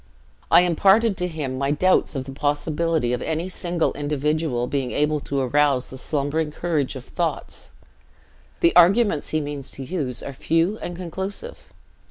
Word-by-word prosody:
I - - +7
imparted 195 +5 +4
to 180 - 0
him 145 -6 -4
my 140 0 0
doubts 160 +2 +2
of 130 -1 -3
the 135 - -7
possibility 150 -1 0
of 125 - -2
any 165 +3 -2
single 175 -2 -1
individual 145 -2 -1
being 130 -1 -2
able 150 +2 +1
to 140 -1 -2
arouse 135 0 +2
the 130 - -7
slumbering 150 +2 -1
courage 150 -4 -1
of 130 - -8
thoughts. - - -3 0.9
The 170 - +4
arguments 180 -1 +4
he 155 - +1
means 145 -2 -5
to 135 - -8
use 135 -6 -3
are 140 - -6
few 165 - 0
and 175 - -5
conclusive. 190 - -6
150 Hz, 160 wpm, -23 LUFS, 140-175 Hz, 0.9 s, I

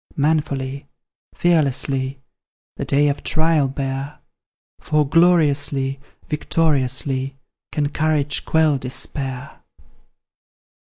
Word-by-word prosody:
Manfully, 140 -2 -1 0.5
fearlessly, 135 -5 +1 0.5
The - - -4
day 145 +1 +3
of 145 0 -1
trial 160 -3 +2
bear, 135 +1 -4 0.6
For 150 -2 +1
gloriously, 145 -5 +3 0.3
victoriously, 135 -3 0 0.3
Can 145 -1 0
courage 150 -2 0
quell 155 -3 +2
despair! 130 +1 -4
140 Hz, 75 wpm, -21 LUFS, 135-155 Hz, 0.6 s, day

